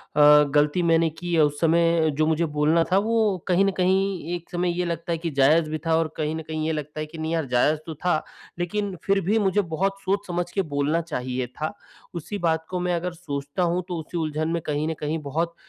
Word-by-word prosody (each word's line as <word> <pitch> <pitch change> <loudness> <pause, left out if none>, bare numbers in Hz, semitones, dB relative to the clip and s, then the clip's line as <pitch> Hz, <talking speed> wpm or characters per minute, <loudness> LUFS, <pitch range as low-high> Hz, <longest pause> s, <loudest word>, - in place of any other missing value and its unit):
अ, 150 0 +7
गलती 150 +4 +3
मैंने 165 -1 +3
की 175 +3 -6
है 165 - +4
उस 145 0 0
समय 165 -1 +3
जो 155 - +3
मुझे 160 +1 +2
बोलना 155 +3 +4
था 185 - +5
वो 230 - 0 0.3
कहीं 185 +1 +3
न 195 - +2
कहीं 185 -2 +1
एक 170 -1 -9
समय 175 0 0
ये 180 - +1
लगता 170 0 -3
है 165 - +1
कि 165 0 -3
जायज़ 155 +4 +4
भी 155 - -2
था 160 - +3
और 165 -1 +1
कहीं 155 +1 -1
न 160 - -4
कहीं 155 -1 -3
ये - - +1
लगता 150 0 -5
है 155 - -2
कि 160 +2 -12
नहीं 160 +1 -3
यार 165 -2 0
जायज़ 150 +5 +3
तो 160 - -5
था, 155 0 0 0.4
लेकिन 200 +2 -2
फिर 195 0 +2
भी 205 +5 +1
मुझे 205 0 +2
बहुत 195 +4 0
सोच 200 +2 -1
समझ 175 0 -2
के 195 - 0
बोलना 150 +4 +1
चाहिए 130 -5 -3
था। 155 - -5 0.4
उसी 175 +5 -4
बात 160 -1 +1
को 180 -1 -2
मैं 180 0 0
अगर 175 +1 -3
सोचता 145 -1 -4
हूँ 175 +1 0
तो 175 - -3
उसी 170 +2 -7
उलझन 155 0 -1
में 170 -1 -1
कहीं 150 +1 -1
न 160 - -1
कहीं 155 +2 -2
बहुत 165 +4 -2
165 Hz, 240 wpm, -24 LUFS, 155-180 Hz, 0.4 s, अ